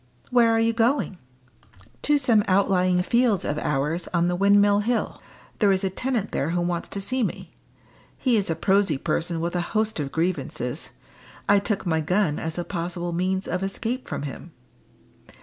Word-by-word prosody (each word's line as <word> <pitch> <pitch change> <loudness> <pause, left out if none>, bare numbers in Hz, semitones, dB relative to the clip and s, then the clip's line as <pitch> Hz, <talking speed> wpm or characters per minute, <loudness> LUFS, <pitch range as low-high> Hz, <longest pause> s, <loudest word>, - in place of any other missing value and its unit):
"Where 240 -2 +5
are 225 - +3
you 225 0 +2
going?" 230 -4 +1 0.8
"To 295 0 +3
some 235 -6 +3
outlying 185 -2 +3
fields 235 -2 +2
of 150 +1 -1
ours 150 +5 -1
on 170 -1 +2
the 180 - 0
Windmill 200 +2 +4
Hill. 230 +3 -1 0.4
There 205 -3 +4
is 190 0 +1
a 190 - 0
tenant 240 0 -2
there 140 - -1
who 175 +1 0
wants 175 0 -2
to 200 - -5
see 255 +6 -1
me. 220 - -3 0.6
He 255 -3 +2
is 200 -4 +1
a 165 - 0
prosy 195 -1 +2
person 165 +4 -2
with 170 +2 -2
a 175 - +1
host 215 +2 -1
of 140 -2 -3
grievances. 175 +3 -2 0.6
I 205 0 +5
took 200 -1 -2
my 160 -2 +1
gun 180 -1 +1
as 160 +1 -4
a 175 - -1
possible 175 -1 -4
means 185 +2 -1
of 180 - -2
escape 230 +6 -3
from - - -4
him." 140 -4 -8
190 Hz, 180 wpm, -24 LUFS, 175-220 Hz, 0.8 s, Where